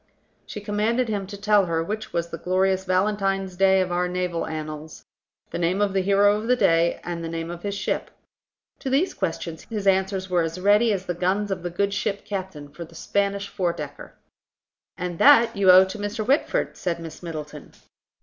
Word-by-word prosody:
She 210 - -6
commanded 220 +4 0
him 200 -3 -2
to 200 +1 -8
tell 205 -2 +3
her 165 -1 0
which 215 +5 -5
was 170 0 -2
the - - -6
glorious 190 +1 +1
Valentine's 195 0 0
day 190 0 +4
of 185 -1 -2
our 180 0 +1
naval 180 -1 -2
annals; 155 0 -7 0.5
the - - -3
name 175 +3 +1
of 205 -2 +1
the 190 - +2
hero 200 +2 +4
of 215 +2 -5
the 250 - +4
day, 165 -7 +2
and 170 -1 -4
the 165 - -4
name 165 0 -4
of 175 0 -8
his 200 +1 -3
ship. - - -2 0.7
To 270 - -4
these 285 +8 +1
questions 165 -3 -4
his 210 -3 -4
answers 190 0 +1
were 180 -2 +2
as 165 +2 -3
ready 205 +4 +4
as 190 -2 -2
the 175 - -2
guns 190 +4 0
of 185 -2 -2
the 175 - -3
good 200 +3 -1
ship 205 -1 -2
Captain, 185 -7 -5
for 150 +4 -9
the 165 0 -15
Spanish 200 +3 -1
four 180 -3 -1
decker. 145 -3 -8 0.8
"And 180 -2 -4
that 235 -5 +6
you 200 -1 +3
owe 185 +1 +9
to 190 +3 -7
Mr. 205 +2 -3
Whitford," 285 - +1
said 170 -2 -2
Miss 165 -1 -9
Middleton. 155 -3 -8
190 Hz, 200 wpm, -24 LUFS, 170-205 Hz, 0.8 s, owe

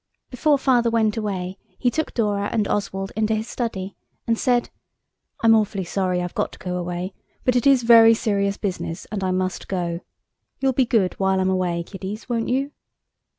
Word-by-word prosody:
Before 285 +4 +2
Father 245 -3 +3
went 220 -2 +2
away 195 -4 -3 0.2
he 245 - +1
took 315 +3 -2
Dora 205 -3 0
and 215 -3 +1
Oswald 195 -1 -2
into 220 0 +1
his 220 +1 -3
study, 200 -6 -4 0.3
and 230 - +2
said– 245 +1 +1 0.7
"I'm 225 0 +7
awfully 210 -3 +1
sorry 180 0 -1
I've 175 - -5
got - - -1
to - - -11
go 180 -1 -4
away, 180 +2 -4 0.3
but 250 - +3
it 245 +3 +3
is 270 -3 +5
very 230 -1 +8
serious 200 -2 0
business, 185 -2 -4
and 205 -3 -3
I 185 - 0
must 185 0 -2
go. 175 -3 -2 0.6
You'll 270 -1 +2
be 255 -1 +2
good 205 -6 +2
while 190 -1 +2
I'm 190 0 +2
away, 180 -2 0
kiddies, 195 +4 -7
won't 235 -2 -1
you?" 270 +3 0
205 Hz, 185 wpm, -23 LUFS, 185-230 Hz, 0.7 s, very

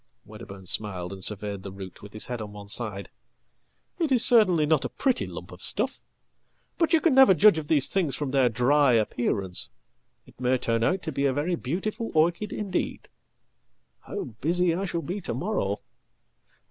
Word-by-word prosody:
"Wedderburn 105 -3 -11
smiled 95 -2 -1
and 95 -1 -8
surveyed 100 -1 -1
the 95 +1 -8
root 95 -1 -10
with 105 0 -12
his 110 - -1
head 120 -2 -5
on 105 -1 -7
one 100 -1 -10
side. 105 -3 -3 0.9
"It 320 -5 0
iscertainly 220 -10 +5
not 150 -2 +2
a - - -2
pretty 260 -3 0
lump - - -9
of - - -12
stuff. - - -1 0.8
But 330 -1 +2
you 325 - +5
can 325 -2 +2
never 265 -8 +7
judge 200 -3 +6
of 150 - -8
thesethings 155 +1 +1
from 145 -3 -3
their 130 -3 +3
dry 130 +4 +3
appearance. 105 -4 0 0.6
It - - -18
may 130 +1 +2
turn 115 -2 -1
out 185 +9 +1
to 160 - -3
be 140 0 -1
a 135 - +1
very 155 +6 -1
beautifulorchid 175 - -1
indeed. 195 -4 -3 0.9
How - - -6
busy 165 +10 0
I 190 +4 -2
shall 170 -3 -3
be 190 +4 -4
to - - -4
morrow! 170 - -1
140 Hz, 170 wpm, -26 LUFS, -, 0.9 s, never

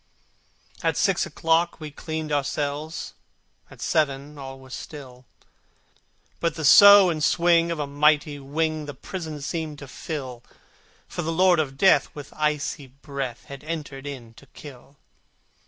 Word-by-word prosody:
At - - 0
six - - +2
o'clock 165 +1 +1
we 155 -2 -7
cleaned 155 +1 -5
our 145 -1 +1
cells, 145 +3 -4 0.6
At - - -15
seven 145 -1 0
all 135 -1 -8
was 130 -1 -13
still, 130 -4 -9 1.1
But 170 - -1
the 160 -2 -3
sough 200 +4 +9
and 155 -2 -3
swing 170 +1 +3
of 170 - -2
a 150 - -2
mighty 145 +1 +2
wing 155 +2 -2
The 145 - -7
prison 155 +1 -7
seemed 155 0 -4
to 145 - -10
fill, 130 -4 -6 0.7
For - - -5
the 165 0 -2
Lord 180 0 +4
of 135 -3 -2
Death 190 +5 +4
with 145 -1 -10
icy 150 -2 -1
breath 135 -2 -6
Had 140 0 -10
entered 150 -4 -6
in 125 -5 -8
to 140 - -19
kill. 140 -1 -13
150 Hz, 150 wpm, -24 LUFS, 140-160 Hz, 1.1 s, sough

